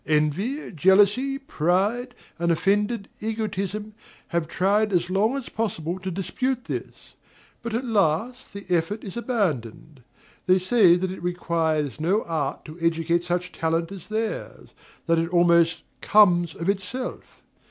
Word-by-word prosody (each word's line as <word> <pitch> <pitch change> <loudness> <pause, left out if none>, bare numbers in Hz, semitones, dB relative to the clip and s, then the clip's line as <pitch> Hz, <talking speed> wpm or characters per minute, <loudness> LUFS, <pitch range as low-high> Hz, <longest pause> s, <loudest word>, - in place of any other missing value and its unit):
Envy, 160 - 0
jealousy, 205 - +3
pride, 215 - 0 0.2
and 170 0 +2
offended 205 +5 +1
egotism 210 -1 -3 0.4
have 170 -2 -1
tried 205 +5 +1
as 175 -1 +1
long 215 +8 +2
as 270 - -6
possible 185 -6 -3
to 190 0 -4
dispute 250 +8 -2
this; - - -7 0.5
but 235 -1 -4
at 250 +3 -2
last 220 +3 0
the 200 -1 -9
effort 170 +6 -1
is 195 - -7
abandoned. 155 - -2 0.5
They 185 0 +6
say 185 -1 +5
that 185 +1 -1
it 190 - -8
requires 165 -5 -1
no 190 +7 +2
art 155 -5 -3
to 155 +3 -10
educate 165 +1 +1
such 175 0 -2
talent 165 +2 -1
as 195 -2 -10
theirs, 220 0 -4 0.4
that 165 -1 +3
it 165 0 -1
almost 170 -1 +3 0.2
"comes 180 -5 +4
of 170 - -5
itself." 200 +6 -4
185 Hz, 140 wpm, -24 LUFS, 170-215 Hz, 0.5 s, They